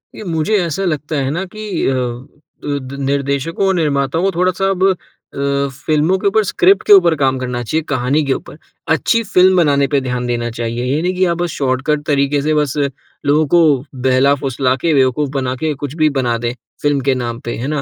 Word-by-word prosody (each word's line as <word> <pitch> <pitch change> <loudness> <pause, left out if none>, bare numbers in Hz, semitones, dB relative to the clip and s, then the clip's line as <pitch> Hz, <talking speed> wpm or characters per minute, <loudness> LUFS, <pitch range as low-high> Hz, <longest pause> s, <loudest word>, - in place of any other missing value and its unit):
ये - - -8
मुझे 170 +3 0
ऐसा 170 +4 -2
लगता 155 -2 -2
है 135 -2 0
ना 170 +5 -2
कि, 215 +1 -4
अ, 135 - +2 0.7
द 140 -2 -4
निर्देशकों 140 +5 -1
और 190 - +2
निर्माताओं 150 0 0
को 195 - +2
थोड़ा-सा 185 +1 +1
अब 190 0 +2 0.4
अ, 140 0 0 0.2
फ़िल्मों 155 +4 +2
के 200 - 0
ऊपर, 215 +2 +3
स्क्रिप्ट 190 0 +3
के - - +8
ऊपर 175 -4 +6
काम 135 -1 +2
करना 125 -1 -3
चाहिए, 155 +8 -1
कहानी 140 +2 +1
के 135 - +1
ऊपर। - - -8 0.4
अच्छी 230 +8 +1
फ़िल्म 185 -2 +4
बनाने 140 -5 +3
पे 140 -1 +1
ध्यान 125 -1 -3
देना 120 -1 -1
चाहिए। 115 +1 -3
ये 140 +5 0
नहीं 180 +2 0
कि 185 +1 +2
आप 170 - -2
बस 175 0 -1
शॉर्टकट 135 +3 -1
तरीके 140 0 +1
से 155 +2 0
बस 150 -2 0 0.5
लोगों 150 +2 +3
को 175 - +7 0.5
बहला-फुसला 130 0 +2
के, 165 - +2
बेवकूफ़ 135 +1 +2
बना 130 -2 -2
के, 155 +3 -2
कुछ 145 0 -6
भी 155 -2 +3
बना 120 -3 0
दें 120 +1 -3 0.3
फ़िल्म 145 -1 +1
के 135 - +3
नाम 120 -2 -4
पे, 120 - -3
है 125 - -4
ना। 150 -1 -1
145 Hz, 205 wpm, -17 LUFS, 130-170 Hz, 0.7 s, के